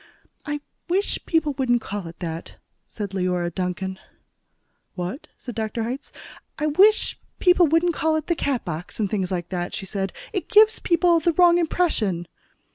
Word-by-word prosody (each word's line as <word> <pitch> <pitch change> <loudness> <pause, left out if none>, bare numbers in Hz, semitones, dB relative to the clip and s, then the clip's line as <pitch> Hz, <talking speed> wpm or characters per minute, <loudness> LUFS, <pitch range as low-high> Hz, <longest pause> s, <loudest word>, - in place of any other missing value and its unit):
"I 295 0 -2 0.3
wish 385 +4 0
people 320 -3 +2
wouldn't 245 -2 +3
call 200 -4 -5
it 165 - -10
that," 165 -1 -5 0.3
said 205 -3 -5
Leora 180 -2 -1
Duncan. 190 +1 -3 1.0
"What?" 180 - -5
said 245 - -8
Dr. 220 +1 -2
Hitz. 255 +5 -5 0.5
"I 300 - -1
wish 390 +9 +4 0.2
people 360 -2 +5
wouldn't 330 +3 +3
call 315 0 +1
it 310 -1 -1
'the 340 - +1
Catbox,' 180 - -3
and 205 -3 0
things 190 -3 -1
like 175 -2 -3
that," 175 -2 -3
she - - -5
said. 195 0 -3 0.2
"It 380 - -3
gives 435 -1 +6
people 340 0 +3
the 335 +1 +1
wrong 350 0 +6
impression." 225 - 0
245 Hz, 160 wpm, -24 LUFS, -, 1.0 s, gives